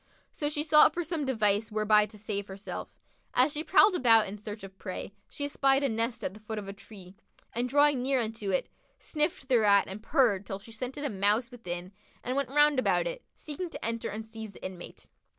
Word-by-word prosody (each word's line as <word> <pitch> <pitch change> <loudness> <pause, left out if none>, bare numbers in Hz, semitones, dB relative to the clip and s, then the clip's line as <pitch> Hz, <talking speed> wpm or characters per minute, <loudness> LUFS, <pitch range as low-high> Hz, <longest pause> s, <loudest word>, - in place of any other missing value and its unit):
So 290 - -2
she 295 0 -1
sought 300 -1 +6
for 350 - -1
some 320 -2 -3
device 215 -4 +1
whereby 210 0 +3
to 210 +1 -12
save 205 -1 -4
herself. 195 +1 -7 0.5
As 255 +4 +4
she 305 0 -3
prowled 385 +3 +5
about 230 -9 +5
in 205 +2 -7
search 210 0 -8
of 195 0 -11
prey, 185 +1 -6 0.2
she 285 - -4
espied 275 -1 +2
a 275 - +2
nest 230 +1 -2
at - - -3
the 210 - -13
foot 215 +1 -6
of 205 -2 -5
a 195 - -6
tree, 195 -2 -13 0.4
and 245 +2 -1
drawing 290 -1 +4
near 265 +1 +1
unto 220 -3 -3
it, 185 - 0 0.3
sniffed 300 -3 -2
thereat 210 -6 +4
and 195 +3 -7
purred 225 -8 +2
till 195 - -4
she 200 +3 -14
scented 255 +5 -5
a - - 0
Mouse 210 +5 +1
within 180 -6 -6 0.3
and 250 +2 -2
went 275 -2 -1
round 295 0 +4
about 255 - +2
it, - - -5
seeking 325 +4 -6
to - - -7
enter 230 0 -2
and 215 +2 -6
seize 220 -2 -8
the - - -11
inmate. 185 -2 -8
230 Hz, 215 wpm, -29 LUFS, 205-280 Hz, 0.5 s, sought